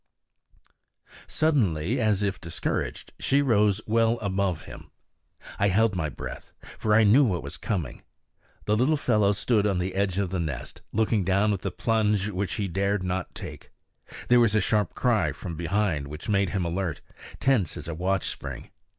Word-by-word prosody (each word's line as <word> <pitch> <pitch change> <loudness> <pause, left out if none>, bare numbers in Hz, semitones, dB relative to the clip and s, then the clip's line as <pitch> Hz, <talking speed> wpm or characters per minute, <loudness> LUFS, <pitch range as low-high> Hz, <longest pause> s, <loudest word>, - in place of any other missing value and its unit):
Suddenly, 115 - +1
as 105 -3 +2
if 100 -1 -2
discouraged, 85 -1 -3
she 140 +1 +2
rose 105 -5 +3
well 115 +1 +2
above 95 -5 -1
him. - - -11 0.7
I 100 - +3
held 105 +2 +2
my 80 -4 -1
breath, - - -8 0.3
for 105 -1 +2
I 115 - +6
knew 115 +8 +6
what 95 -9 0
was 70 +3 -6
coming. 90 - -3 0.6
The 105 - +2
little 130 +7 +2
fellow 105 -7 +2
stood 105 0 +1
on 100 -3 +1
the 90 +1 -2
edge 95 -1 0
of 100 -3 -1
the 95 - -1
nest, 75 -7 -5
looking 110 -1 +1
down 100 +3 +2
at 95 - -3
the 100 - -2
plunge 105 0 +1
which 100 -1 -2
he 100 - -2
dared 100 +2 0
not 90 0 -3
take. - - -9 0.6
There 125 0 +6
was 115 -3 +3
a - - +5
sharp 105 +2 0
cry 110 - +1
from 85 +4 -7
behind, 85 -3 -1
which 75 +6 -8
made 100 -3 +2
him 95 -3 -1
alert, 85 -3 -2 0.4
tense 120 - +1
as 75 - -6
a 85 - -3
watch 95 +3 -1
spring. - - -7
100 Hz, 175 wpm, -26 LUFS, 90-110 Hz, 0.7 s, I